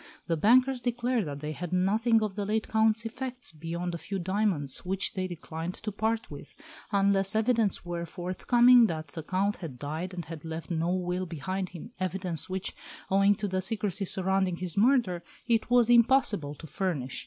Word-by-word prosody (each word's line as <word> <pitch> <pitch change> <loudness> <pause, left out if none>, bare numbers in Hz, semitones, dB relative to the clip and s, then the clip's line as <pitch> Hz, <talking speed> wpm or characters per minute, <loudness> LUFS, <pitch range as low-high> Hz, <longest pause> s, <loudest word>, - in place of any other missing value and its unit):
The 170 - 0
bankers 250 - +4
declared 240 -4 0
that 140 -1 -6
they 150 0 -3
had 175 +2 -6
nothing 215 +5 +3
of 210 -2 -2
the 205 +1 -3
late 215 +2 -1
Count's 220 +1 +2
effects 250 +2 -5
beyond 170 +3 -4
a 170 - -4
few 195 +5 -4
diamonds, 185 -7 0
which 190 +2 -1
they 185 -1 -2
declined 170 0 -6
to 215 - -4
part 220 +3 -1
with, - - -10 0.4
unless 200 0 +2
evidence 220 -4 +1
were 170 -1 -4
forthcoming 235 +8 +4
that 155 -4 -4
the 160 - -6
Count 195 +5 0
had 155 -8 -7
died 160 +7 -4
and 175 -3 -5
had 160 -1 -8
left 160 +2 -6
no 165 0 0
will 180 0 -1
behind 185 +4 -3
him 180 +6 -10
evidence 185 -4 -3
which, 190 0 -3 0.4
owing 195 +1 +5
to 205 - -3
the 185 -1 -1
secrecy 200 -1 -1
surrounding 190 -1 +1
his 180 -1 -4
murder, 210 -6 +3 0.2
it 230 -1 +1
was 245 -2 +5
impossible 235 - +3
to 160 - -11
furnish. 160 -7 -3
190 Hz, 180 wpm, -29 LUFS, 170-220 Hz, 0.4 s, owing